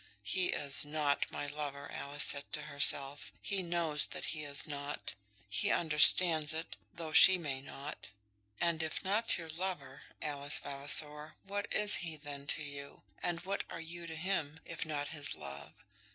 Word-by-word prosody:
"He 180 - 0
is 140 -1 0
not 145 -1 -1
my - - -5
lover," 145 -1 -6
Alice 145 +1 +1
said 140 0 +3
to 150 - -3
herself. 145 -1 +5
"He 200 -1 -2
knows 170 -4 +1
that - - -7
he 155 -1 -6
is 145 -1 -2
not. 145 -1 -5 0.3
He 105 - -1
understands 160 0 +5
it, 160 +1 -5 0.2
though 165 -2 -7
she 190 +4 +7
may 140 -6 -5
not." 140 0 -9 0.5
And 170 -2 0
if 160 -1 -4
not 210 +4 +2
your 165 -2 -8
lover, 185 +3 -5 0.2
Alice 145 -1 +2
Vavasor, 150 +2 0
what 200 +1 -5
is 210 0 +4
he 165 -3 -6
then 145 -1 -9
to 155 - 0
you? 140 -1 -10 0.2
And 175 -1 -2
what 195 +1 -3
are - - -7
you 170 +1 -8
to 160 - -7
him, 160 -3 -3
if 165 0 -6
not 145 -2 -4
his 145 -3 -3
love? 70 +1 -10
150 Hz, 165 wpm, -33 LUFS, 145-170 Hz, 0.5 s, she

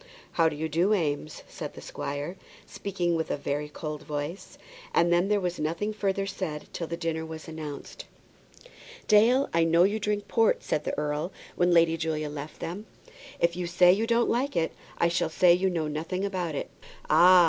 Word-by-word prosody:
"How 165 -1 +3
do 155 - -6
you 160 +2 -2
do, 175 +7 +2
Eames?" 150 -4 -2
said - - -7
the - - -8
squire, 145 +5 -4 0.3
speaking 180 -4 -2
with 160 -1 -2
a - - -1
very 145 +1 -3
cold 150 0 -5
voice. 150 +5 -5 0.4
And 170 0 +4
then 175 +2 +3
there 205 0 +2
was 180 -2 -2
nothing 170 +8 -1
further 195 -2 -1
said 185 -6 -4
till 170 - -3
the 170 - -4
dinner 165 -2 -2
was 160 0 -8
announced. 155 -3 -7 1.0
"Dale, 235 +6 +5
I 165 0 +4
know 165 +1 +5
you 205 +3 +2
drink 210 -1 -1
port," 225 -2 +2
said 150 - -1
the - - -2
earl 150 +4 -1 0.2
when 175 0 +3
Lady 165 -1 +5
Julia 155 -2 -2
left 150 +1 -8
them. 195 +6 -5 0.5
"If 170 0 +2
you 180 -1 -3
say 175 +1 +6
you 220 +4 0
don't 235 0 +3
like 265 +4 0
that, 165 -1 +1 0.3
I 170 - +3
shall 170 -1 0
say 175 +2 +5
you 185 +2 +2
know 165 -4 -1
nothing 165 +6 -2
about 180 -6 -2
it." - - -4 0.4
"Ah! 180 +1 +7
170 Hz, 190 wpm, -28 LUFS, 155-195 Hz, 1.0 s, Ah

